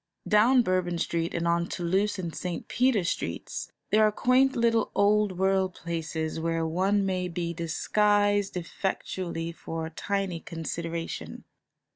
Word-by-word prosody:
Down 240 +4 +5
Bourbon 185 -3 0
Street 165 0 -1
and 170 0 0
on 170 0 +2
Toulouse 190 +4 0
and 170 -3 -4
St. 180 -2 -4
Peter 245 -5 +2
Streets 170 - -3 0.2
there 215 +1 +5
are 215 - +5
quaint 255 +4 +3
little 230 -1 +2
old 205 -2 +3
world 190 -1 +1
places 160 -1 -3
where 165 0 0
one 190 +5 +1
may 185 -1 -1
be 170 -1 -3
disguised 205 +4 +1
effectually 170 -1 -3
for 165 -1 -5
a 160 - -7
tiny 195 0 -2
consideration. 165 0 -5
185 Hz, 135 wpm, -28 LUFS, 170-205 Hz, 0.2 s, Down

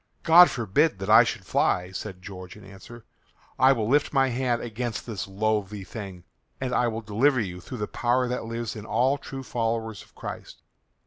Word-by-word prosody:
"God 175 +2 +8
forbid 120 +5 +1
that 95 +2 -2
I 115 +2 +9
should 115 -5 -4
fly," 90 0 +1
said 95 -1 -7
George 95 0 -9
in 105 - -14
answer; 100 +4 -13 0.5
"I 130 +1 +6
will 115 -5 0
lift 145 +4 +2
my 135 -1 +3
hand 125 -1 0
against 120 0 -4
this 110 -6 -5
loathly 105 0 -1
thing, 95 -3 -8 0.4
and 130 -1 -3
I 125 - +2
will 115 0 -3
deliver 120 +6 +2
you 90 -5 -4
through 125 - -8
the 105 -2 -3
power 125 +1 0
that 125 -1 -3
lives 115 0 -4
in 105 - -7
all 135 +3 +1
true 135 -1 -7
followers 115 -3 -2
of - - -19
Christ." - - -8
115 Hz, 190 wpm, -26 LUFS, 100-125 Hz, 0.5 s, I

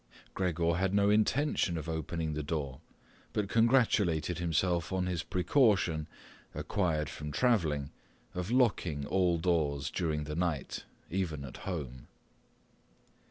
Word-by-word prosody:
Gregor 85 -2 +1
had 95 +1 +1
no 100 0 +4
intention 110 - +2
of 80 0 -5
opening 80 0 -2
the 75 - -2
door, 70 -3 -3 0.5
but 105 -2 0
congratulated 100 - +3
himself 85 +1 0
on 95 -1 0
his 90 -2 -1
precaution, 90 - +2 0.5
acquired 80 -6 0
from 75 0 -6
travelling, 80 - +1 0.4
of 90 +2 -3
locking 100 - +2
all 90 -1 +2
doors 75 -5 0
during 80 -4 -1
the 75 +1 -5
night, 85 -5 -2 0.3
even 80 -6 -2
at 65 - -9
home. 65 -8 -5
85 Hz, 120 wpm, -31 LUFS, 75-95 Hz, 0.5 s, no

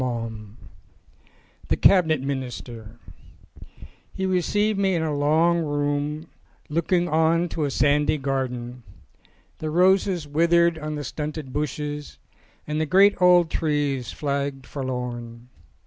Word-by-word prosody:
S3 115 -4 -4 1.1
THE - - +1
CABINET 160 -7 +4
MINISTER 120 -4 -6 1.2
HE 190 - -3
received 200 +3 +1
me 190 -2 +2
in 165 - 0
a 155 -2 -1
long 160 +4 +2
room 145 +1 -2 0.4
looking 170 +3 +1
1 170 - -4
on 165 +2 +2
to 155 -2 -2
a - - -1
sandy 145 +2 +2
garden. 125 -3 -3 0.8
The 155 - -3
roses 180 -1 +2
withered 170 +2 +2
on 155 0 -4
the 145 - -4
stunted 150 0 -5
bushes 150 0 -4 0.5
and 150 +1 -2
the 155 - -1
great 195 +5 +5
old 180 -2 +5
trees 145 -5 -1
flagged 140 -2 -3
forlorn. 125 -3 -6
150 Hz, 120 wpm, -24 LUFS, 135-170 Hz, 1.2 s, great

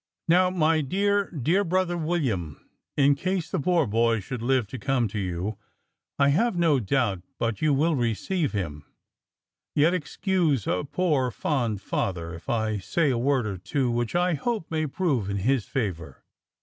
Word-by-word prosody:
"Now 180 +2 +5
my 160 -3 +2
dear, 200 +6 +1
dear 165 +7 +1
brother 185 -1 0
William, 135 - -1 0.4
in 140 0 +5
case 180 +4 -2
the 185 - 0
poor 170 +1 +2
boy 115 +1 +2
should 115 +4 -6
live 130 0 +2
to 130 - -6
come 135 -2 +1
to 105 - -4
you, 95 +2 -3 0.6
I 140 0 +4
have 210 +10 +2
no 165 -5 +3
doubt 110 -4 0 0.2
but 115 -3 -2
you 155 -1 +3
will 155 +4 +2
receive 135 - -1
him; 80 -8 -4 0.9
yet 155 +4 +4
excuse 175 - 0
a 90 - -1
poor, 145 -5 +1
fond 115 -6 -1
father, 85 -3 -2
if 80 - -10
I 110 -2 0
say 145 - +1
a 125 - 0
word 130 -1 +1
or 100 -4 -4
two 125 +6 -1
which 120 +4 -1
I 180 0 +2
hope 210 - -2
may 155 -1 0
prove 135 - -1
in 100 - -1
his 120 +3 +1
favour. 85 - -4
135 Hz, 170 wpm, -26 LUFS, 110-170 Hz, 0.9 s, Now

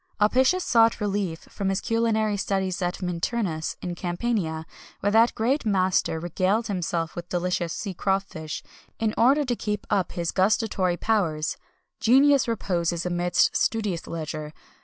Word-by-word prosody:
Apicius 260 - +3
sought 230 -1 +4
relief 200 -5 -2
from 195 -2 -2
his 195 0 0
culinary 220 -2 +1
studies 195 -2 -1
at 180 +1 -2
Minturnus, 175 -1 -2
in 180 - -3
Campania, 175 -2 -2 0.3
where 205 - 0
that 225 +2 +4
great 260 +7 +1
master 185 -5 +1
regaled 185 +6 0
himself 170 -5 -2
with 175 0 -7
delicious 175 -1 -1
sea 195 +2 -4
crawfish, 190 -5 -2 0.3
in 220 -1 0
order 275 +6 +4
to 245 -2 0
keep 210 -2 -3
up 195 -3 +1
his 170 -1 -2
gustatory 190 -2 +1
powers. 170 -9 0 0.4
Genius 275 +3 +5
reposes 175 -6 -1
amidst 175 0 +2
studious 210 -7 0
leisure. 155 -2 -5
195 Hz, 140 wpm, -25 LUFS, 175-225 Hz, 0.4 s, Genius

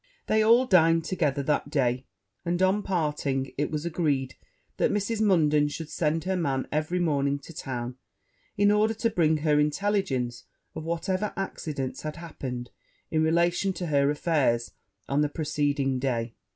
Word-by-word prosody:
They 220 0 +2
all 230 +4 +5
dined 165 -6 +4
together 150 -7 0
that 145 +1 0
day; 125 -2 0 0.4
and, 175 0 -1
on 190 +2 +3
parting, 150 -7 -1
it 145 +1 -1
was 155 +1 -3
agreed 150 -6 0 0.4
that - - +2
Mrs. 210 +2 -1
Munden 150 -8 +4
should 155 +2 -6
send 160 0 0
her 190 +2 -1
man 140 -7 -1
every 155 +4 0
morning 140 -5 +1
to 140 +4 -12
town, 125 -3 -5 0.6
in 205 0 +4
order 215 +2 +2
to 230 +1 0
bring 160 -4 +3
her 150 -1 +2
intelligence 150 - 0 0.3
of 160 - -6
whatever 185 +5 -1
accidents 150 -8 -4
had 155 0 -5
happened 130 -8 -6 0.4
in 155 - +2
relation 170 +4 +2
to 180 - -4
her 140 -3 +2
affairs 145 -6 +1 0.4
on 140 +2 +1
the 150 - +1
preceding 145 -3 0
day. 120 -3 -1
155 Hz, 155 wpm, -27 LUFS, 140-180 Hz, 0.6 s, all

